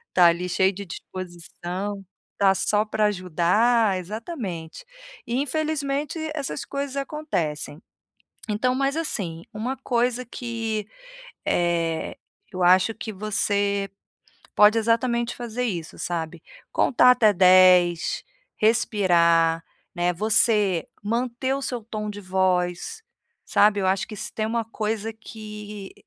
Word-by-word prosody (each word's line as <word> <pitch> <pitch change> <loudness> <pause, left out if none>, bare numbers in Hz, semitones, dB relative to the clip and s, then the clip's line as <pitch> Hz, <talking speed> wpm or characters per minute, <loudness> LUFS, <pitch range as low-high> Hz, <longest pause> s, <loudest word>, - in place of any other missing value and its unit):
está 180 -1 +6
ali 170 +1 +2
cheio 190 +2 +3
de 200 +1 -7
disposição 185 +3 -6 0.4
está 195 -1 +5
só 210 +2 +1
pra 215 0 +1
ajudar, 195 +3 +2
exatamente. 195 - -6 0.4
E 250 +4 0
infelizmente 295 0 -2 0.2
essas 285 -2 -4
coisas 280 -1 -4
acontecem. 180 - -3 0.7
Então 250 +5 +1
Mas 275 +3 0
assim, 175 - -3
uma 245 +5 -3
coisa 250 -1 0
que, 225 -3 -4 0.6
eh, 170 -2 0 0.4
eu 185 -1 -3
acho 185 +5 +5
que 220 - -6
você 200 -1 0 0.7
pode 210 +2 +6
exatamente 235 +1 +1
fazer 240 0 -4
isso, 175 -9 -4
sabe, 170 -1 -4 0.3
contar 250 0 +4
até 225 -4 +4
dez, 180 -2 +5 0.3
respirar, 170 -7 +3 0.3
né. 175 0 +1
Você 210 -2 +2 0.2
manter 245 +4 -1
o 275 - -4
seu 245 -3 -3
tom 215 -1 -5
de 205 0 -9
voz, 185 - 0 0.4
sabe, 205 0 +4
eu 190 - 0
acho 190 +1 +1
que 215 - -8
se - - -6
tem 215 - -1
uma 230 +1 -1
coisa 220 0 -3
que, 210 -2 -9
210 Hz, 120 wpm, -24 LUFS, 180-235 Hz, 0.7 s, está